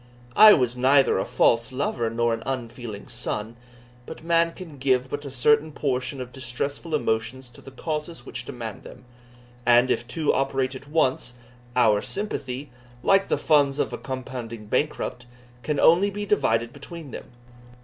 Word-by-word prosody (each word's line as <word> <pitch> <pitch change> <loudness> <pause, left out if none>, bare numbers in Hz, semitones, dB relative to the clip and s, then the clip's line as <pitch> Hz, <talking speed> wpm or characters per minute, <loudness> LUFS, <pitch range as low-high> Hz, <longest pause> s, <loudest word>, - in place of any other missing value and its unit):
I 215 0 +10
was 125 -3 +2
neither 135 -3 +4
a - - -1
false 115 +2 +2
lover 130 -3 -1
nor 120 +1 +1
an 115 - -3
unfeeling 120 -4 -5
son; 115 -2 -4 0.5
but - - -9
man 165 0 +3
can 165 -6 -11
give 130 -1 +1
but 145 0 -4
a - - -5
certain 150 +4 +2
portion 135 -2 -2
of 125 -1 -6
distressful 140 +5 -3
emotions 115 0 -2
to 120 - -16
the - - -11
causes 150 0 -5
which 120 -2 -6
demand 115 -4 -7
them; - - -13 0.6
and 120 +1 +5
if 120 - -1
two 155 +4 0
operate 135 -1 0
at 135 +2 -10
once, 130 -5 0 0.4
our 110 -4 +4
sympathy, 145 -10 -3 0.3
like 195 0 +4
the - - +1
funds 145 -3 +3
of - - -1
a - - -3
compounding 125 -4 -6
bankrupt, 125 0 -2 0.3
can 150 +2 -2
only 180 +5 +5
be 205 +1 -4
divided 115 - +1
between 145 +1 -9
them. - - -7
130 Hz, 160 wpm, -25 LUFS, 120-150 Hz, 0.6 s, I